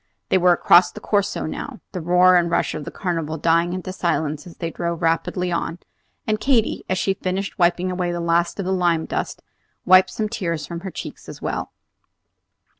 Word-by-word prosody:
They 190 - +4
were 180 0 +5
across 175 +1 +5
the - - -9
Corso 200 -2 0
now, 245 - -6
the 180 - -4
roar 180 +2 +5
and 175 -1 +3
rush 170 - 0
of 150 -2 -5
the - - -5
Carnival 165 -4 -3
dying 165 +2 +2
into 185 0 -5
silence 155 -4 -1
as 170 - -13
they 165 -1 -3
drove 170 0 -3
rapidly 175 +2 0
on; 170 0 -2 0.5
and 215 -1 0
Katy, 250 -4 +1
as 185 - +1
she 195 - +1
finished 190 +2 -4
wiping 175 +1 +2
away 180 -1 -1
the 175 - -3
last 170 0 +1
of 195 - -2
the 190 - 0
lime 175 -3 +1
dust, - - -4 0.4
wiped 185 +1 +6
some 215 - -2
tears 170 -9 -3
from 170 +2 -6
her 190 +2 -6
cheeks - - -8
as - - -9
well. - - -3
175 Hz, 195 wpm, -22 LUFS, 170-185 Hz, 0.5 s, wiped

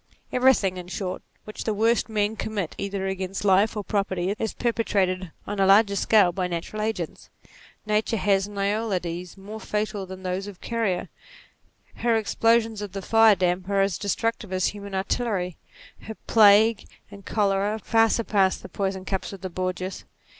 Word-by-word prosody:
Everything 250 -8 +3
in 180 -1 -7
short, 180 +1 -4 0.2
which 215 - -7
the 220 - -1
worst 225 +2 +2
men 210 0 0
commit 205 -7 -3
either 200 -1 -3
against 190 +1 -3
life 200 +3 +3
or 210 - -2
property 195 -2 -1
is 220 - -1
perpetrated 195 -6 0 0.2
on 205 0 -4
a 195 - +4
larger 200 +1 +5
scale 200 -3 +4
by 180 0 -2
natural 175 +5 -4
agents. 215 -7 -4 0.6
Nature 215 +2 0
has 195 0 +2
Noyades 195 -4 -2
more 205 +3 -8
fatal 210 -2 -3
than 190 0 -9
those 185 +2 -3
of 200 -3 -10
Carrier; 225 -6 -1 0.9
her 235 -1 +2
explosions 225 0 +2
of 205 -3 -6
fire 225 -1 +6
damp 180 0 -1
are 200 -1 +2
as 195 -2 0
destructive 210 0 -2
as 185 -1 +1
human 200 -1 -7
artillery; 190 -3 -1 0.4
her 220 - -8
plague 215 0 +5 0.2
and 200 -1 -11
cholera 200 +1 0
far 225 +1 +3
surpass 200 -5 +2
the - - -11
poison 190 -1 -3
cups 190 -1 -3
of 195 - -10
the 185 -1 -5
Borgias. 185 +1 -4
200 Hz, 160 wpm, -25 LUFS, 190-220 Hz, 0.9 s, fire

